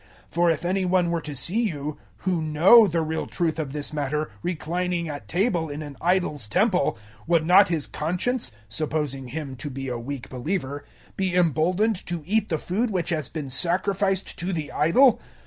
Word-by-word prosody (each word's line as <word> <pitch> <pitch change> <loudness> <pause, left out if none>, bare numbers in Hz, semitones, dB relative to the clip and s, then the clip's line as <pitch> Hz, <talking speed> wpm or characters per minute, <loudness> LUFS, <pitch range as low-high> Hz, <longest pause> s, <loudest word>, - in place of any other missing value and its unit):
008:010 - - -33
For 175 +1 +3
if 165 +1 0
any 190 +2 +1
one 180 -1 +2
were 170 -1 -1
to 150 -1 -6
see 180 - +2
you, 150 -9 -3 0.2
who 180 -3 -1
know 175 +9 +6
the 165 -2 0
real 160 +1 -3
truth 165 -2 -1
of 150 -4 -3
this 150 +1 -2
matter, 150 0 -2
reclining 175 +1 -2
at 145 -2 -7
table 175 -4 0
in 145 +2 -5
an 145 -2 -9
idol's 175 - +1
temple, 185 - +2 0.3
would 165 -2 +3
not 190 +4 +6
his 160 -4 0
conscience 180 - -2 0.2
(supposing 140 +2 -2
him 140 0 -5
to 145 - -5
be 135 0 -5
a 120 -1 -3
weak 135 +1 -6
believer) 145 +1 -3 0.3
be 190 -2 0
emboldened 180 - +2
to 175 -3 -3
eat 215 +3 +1
the 160 - 0
food 205 +10 -1
which 180 -5 -1
has 155 -5 -1
been 150 -4 -5
sacrificed 190 +5 +1
to 180 +3 -2
the 160 -5 -3
idol? 235 - +4
165 Hz, 185 wpm, -25 LUFS, 150-185 Hz, 0.3 s, know